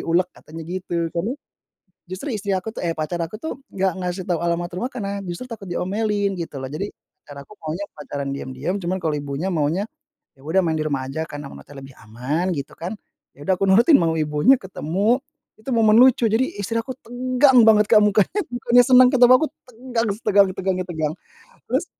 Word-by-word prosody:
ulek," 175 +2 +2
katanya 160 +1 -11
gitu. 180 +1 -5 0.2
Karena, 180 +8 -2 0.8
justru 185 +10 -6
istri 205 -1 -4
aku 220 +4 -6
tuh - - -6
eh, 170 -2 -1
pacar 155 +3 -3
aku 170 +6 -5
tuh 275 +1 -6
nggak 190 0 0
ngasih 180 +1 -3
tahu 175 -3 -1
alamat 170 0 -1
rumah 240 +8 -3
karena 200 -6 -4
justru 180 +5 -6
takut 225 -5 -9
diomelin 205 +3 -1
gitu 165 -4 -6
loh. 130 - -5
Jadi 195 +7 -4 0.3
pacar 140 -1 -11
aku - - -25
maunya 160 +6 -4
pacaran 145 -1 -5
diam-diam, 140 +6 -4
cuman 180 +2 -2
kalau 155 - 0
ibunya 145 +6 -3
maunya, 160 +6 0 0.5
"Ya 135 - -20
udah 165 +6 +2
main 165 -3 0
di 155 - -1
rumah 135 -3 -2
aja 160 +4 -3
karena 145 -2 -8
memantaunya 140 0 -12
lebih 135 - -15
aman." 130 +11 -2
Gitu 140 -4 -5
kan, 175 +5 -5 0.4
ya 145 +1 -13
udah 190 - +4
aku 195 - -1
nurutin 235 +10 +6
mau 165 -7 +3
ibunya 150 - +3
ketemu, 195 - -1 0.3
itu 220 +5 -8
momen 220 -3 +4
lucu. 255 -2 +5
Jadi 225 +4 +1
istri 205 +3 -3
aku 260 +2 -8
tegang 255 +2 +3
banget 215 -1 +5
Kak 210 0 +5
mukanya, 210 - +2
bukannya 245 0 +4
senang 255 0 +8
ketemu 250 -1 +7
aku, 315 - 0 0.2
tegang 240 -1 -3
setegang 200 -3 +4
tegangnya 185 -1 -1
tegang. 155 -2 -2 0.5
Terus 265 +8 0
185 Hz, 195 wpm, -22 LUFS, 160-225 Hz, 0.8 s, senang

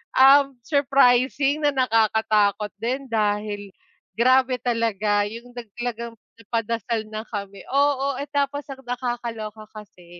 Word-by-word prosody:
uhm, 275 +1 +6
surprising 275 +1 +2
na 290 - +3
nakakatakot 220 -4 +2
din 260 +4 -3
dahil 205 -2 -1 0.4
grabe 255 +3 +3
talaga 215 -4 0
yung 235 +3 -10
nag 240 -2 -7
talagang 235 -1 -4 0.3
nagpadasal 230 0 -2
na 215 +1 -6
kami, 200 -2 -7
oo, 280 0 +1
eh, 280 +2 -4
tapos 285 0 -1
ang 265 - -8
nakakaloka 235 -3 -4
kasi 205 -4 -13
235 Hz, 120 wpm, -23 LUFS, 215-265 Hz, 0.4 s, uhm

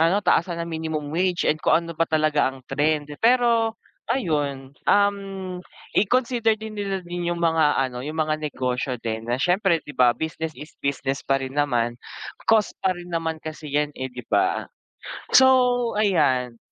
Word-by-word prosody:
ano, 165 +5 +4
taasan 170 0 +2
ang 170 - -3
minimum 160 -2 -3
wage 180 0 +1
and 155 0 +1
kung 170 - +3
ano 170 - -6
ba 165 +1 0
talaga 155 -2 +2
ang 130 -1 -14
trend. 150 +1 0 0.2
Pero 230 -2 +3 0.3
ayun, 145 - -1 0.2
um, 195 -2 +1 0.3
i-consider 230 0 +2
din 220 0 -7
nila 195 -2 -3
din 175 0 -3
yung 175 - -1
mga 160 -3 +3
ano, 125 -1 -7
yung 155 +3 -5
mga 155 -1 +1
negosyo 130 -3 -2
din 115 0 -4
na 120 - +2
siyempre, 180 +1 +2
di 145 - -9
ba 125 -1 +5
business 160 +2 -4
is 150 - -10
business 135 -1 -1
pa 135 - +1
rin 130 0 -6
naman. 120 -5 +1 0.6
Cost 220 -2 +3
pa 190 - +3
rin 175 0 -10
naman 165 -1 -1
kasi 155 -1 -7
'yan, 150 +1 0
eh, 130 - -4
di 125 0 -9
ba? 375 +1 +1 0.7
So 250 -2 +4
ayan, 140 - +2
160 Hz, 170 wpm, -24 LUFS, 145-195 Hz, 0.7 s, ba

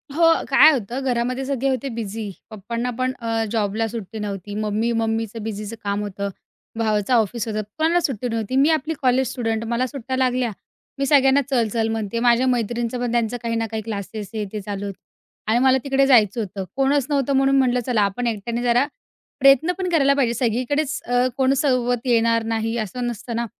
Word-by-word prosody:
हो 335 - +4 0.2
काय 285 +3 +7
होतं, 250 0 -3
घरामध्ये 250 +2 -1
सगळे 275 0 -1
होते 265 +1 -2
बिझी. 220 -2 -4 0.2
पप्पांना 230 +4 -4
पण 255 0 0
अ, 225 -1 -1
जॉबला 220 0 0
सुट्टी 220 -1 -7
नव्हती, 205 -1 -5
मम्मी 215 +2 -1
मम्मीचं 225 0 -2
बिझीचं 215 0 -5
काम 200 0 -1
होतं, 200 -1 -4 0.5
भावाचं 215 +1 +1
ऑफिस 230 0 +1
होतं, 215 -1 -2 0.2
कोणाला 330 +3 +3
सुट्टी 250 -6 -2
नव्हती. 225 +2 -2
मी 275 +3 +4
आपली 315 0 0
कॉलेज 255 -1 +2
स्टुडंट. 225 -3 -2
मला 245 +2 +1
सुट्ट्या 260 -1 -5
लागल्या, 255 -2 +1 0.5
मी 275 - +1
सगळ्यांना 275 -1 +5
चल-चल 230 -3 +1
म्हणतेय, 225 0 -2
माझ्या 240 +1 +3
मैत्रिणींचं 240 0 -1
पण 245 -1 -1
त्यांचं 235 0 0
काही 230 0 -1
ना 225 0 0
काही 220 -1 -3
क्लासेस 205 -1 -5
हे 215 -1 -2
ते 215 - -3
चालू 200 0 -5
होतं. 200 -2 -7 0.5
आणि 235 - +3
मला 265 0 +5
तिकडे 275 0 +2
जायचं 230 -4 +4
होतं, 195 -2 -5
कोणच 275 0 +2
नव्हतं 280 -1 +1
म्हणून 270 0 +3
म्हटलं 250 -2 +3
चला 240 -4 +1
आपण 205 +5 0
एकट्याने 230 +2 -2
जरा 245 +2 +3 0.5
प्रयत्न 275 +5 +5
पण 370 -1 -2
करायला 280 -5 +4
पाहिजे. 255 -4 +1
सगळीकडेच 255 +6 -1
अ, 245 +1 +2
कोण 265 0 +3
सोबत 255 -3 0
येणार 230 -1 +3
नाही, 225 +1 -1
असं 235 +3 -3
नसतं 235 0 -5
ना? 235 +1 -1
235 Hz, 185 wpm, -22 LUFS, 220-265 Hz, 0.5 s, काय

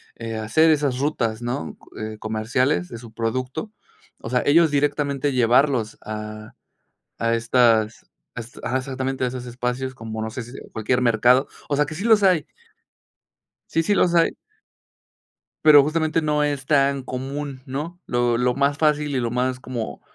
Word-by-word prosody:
eh, 115 -1 -5
hacer 115 +10 +3
esas 145 -4 +1
rutas, 120 -6 -1
¿no?, 120 -10 -4
co - - -21
eh, 110 0 -5
comerciales 110 -2 0
de 115 - -7
su 115 -1 -12
producto. 130 - -3 0.5
O - - -7
sea, 125 -1 +2
ellos 160 +2 +5
directamente 145 -1 0
llevarlos 125 -1 +2
a 110 0 -7 0.7
a 115 0 +1
estas 115 -2 +2 0.3
a - - -5
este 115 +1 -11
Ajá, 130 - 0
exactamente 130 0 -3
a - - +1
esos 125 0 -6
espacios, 125 +2 -3
como 110 -3 -6
no 110 - -3
sé 120 +3 -5
si 120 +1 -11 0.2
cualquier 125 +3 0
mercado. 125 +3 +4 0.2
O 145 - 0
sea, 150 +1 +2
que 155 - -7
sí 170 - -5
los 220 -3 +5
hay. 180 -5 +3 1.3
Sí, 165 - +2
sí 205 - +2
los 180 -3 +3
hay. 165 - +4 1.3
Pero, 150 -2 +8
justamente 160 +2 0
no 150 -1 +1
es 145 -2 -2
tan 140 -2 +2
común, 135 +2 -5
¿no? 150 +6 -5
Lo 120 -1 +1
lo 125 +1 +2
más 140 +1 +1
fácil, 150 -1 +1
y - - +1
lo 120 -1 -1
más 125 +1 -1
como 120 - -5
130 Hz, 170 wpm, -23 LUFS, 115-145 Hz, 1.3 s, Pero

